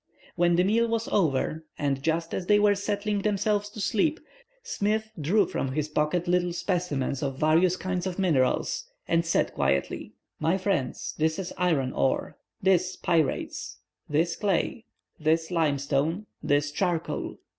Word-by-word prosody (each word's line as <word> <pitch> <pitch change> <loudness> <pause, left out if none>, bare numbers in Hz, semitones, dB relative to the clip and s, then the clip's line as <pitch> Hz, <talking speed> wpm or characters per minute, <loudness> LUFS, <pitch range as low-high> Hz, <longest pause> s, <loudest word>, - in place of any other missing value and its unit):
When 175 -1 +3
the 180 - +4
meal 225 +5 +3
was 230 +1 -1
over, 160 - +1
and 140 -2 -1
just 165 +2 -1
as 180 - -3
they 210 - +6
were 205 0 +5
settling 205 0 -1
themselves 205 0 0
to 210 - -10
sleep, 225 - +1 0.4
Smith 220 - -1
drew 195 +7 +3
from 135 -5 -3
his 155 +1 -1
pocket 155 +4 0
little 180 0 +2
specimens 170 -8 -1
of 135 -2 -2
various 165 +5 +3
kinds 185 -1 -2
of 180 - -4
minerals, 155 -10 +1 0.2
and 165 0 +2
said 165 - +1
quietly, 70 0 -1 0.3
"My 165 +4 +2
friends, 185 -10 -1
this 160 0 +1
is 185 -2 -4
iron 155 -8 +1
ore, 135 - 0 0.3
this 185 -1 +3
pyrites, 160 -4 -1 0.3
this 165 +3 +1
clay, 210 +3 -1 0.3
this 160 +2 +1
limestone, 155 +3 0 0.2
this 145 0 +1
charcoal. 175 +1 -2
175 Hz, 145 wpm, -27 LUFS, 150-200 Hz, 0.4 s, they